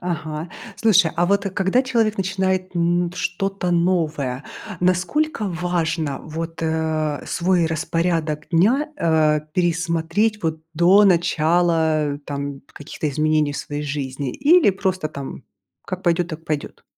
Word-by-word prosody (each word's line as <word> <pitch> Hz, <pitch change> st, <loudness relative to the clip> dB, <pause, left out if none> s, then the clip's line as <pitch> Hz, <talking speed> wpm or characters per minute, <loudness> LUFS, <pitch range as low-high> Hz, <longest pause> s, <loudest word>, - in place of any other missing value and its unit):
Ага. 155 Hz, -2 st, -4 dB, 0.3 s
Слушай, 195 Hz, -7 st, +4 dB
а 175 Hz, +1 st, +2 dB
вот, 200 Hz, +1 st, +1 dB
э, -, -, -1 dB
когда 190 Hz, +7 st, +1 dB
человек 230 Hz, -4 st, +1 dB
начинает, 190 Hz, -1 st, -1 dB
м, 175 Hz, +1 st, +1 dB
что-то 180 Hz, +1 st, -2 dB
новое, 155 Hz, -7 st, 0 dB, 0.4 s
насколько 195 Hz, -, +1 dB
важно, 165 Hz, -5 st, -1 dB
вот, 165 Hz, +1 st, -6 dB
э, 160 Hz, -2 st, -1 dB
свой 175 Hz, -1 st, +1 dB
распорядок 160 Hz, -1 st, -1 dB
дня, 225 Hz, -, +3 dB
э, 155 Hz, -, +2 dB
пересмотреть 175 Hz, +4 st, 0 dB
вот 160 Hz, -1 st, -2 dB
до 185 Hz, +5 st, +6 dB
начала, 165 Hz, -4 st, +2 dB
там, 140 Hz, -1 st, -5 dB
каких-то 155 Hz, +2 st, -5 dB
изменений 155 Hz, 0 st, +1 dB
в -, -, -6 dB
своей 145 Hz, 0 st, -5 dB
жизни? 140 Hz, -2 st, -4 dB
Или 300 Hz, -, +5 dB
просто, 185 Hz, -4 st, -2 dB
там, 140 Hz, -3 st, -8 dB, 0.4 s
как 185 Hz, 0 st, -5 dB
пойдет, 175 Hz, 0 st, +1 dB
так 160 Hz, 0 st, -8 dB
пойдет? 150 Hz, -2 st, -4 dB
170 Hz, 125 wpm, -21 LUFS, 155-185 Hz, 0.4 s, до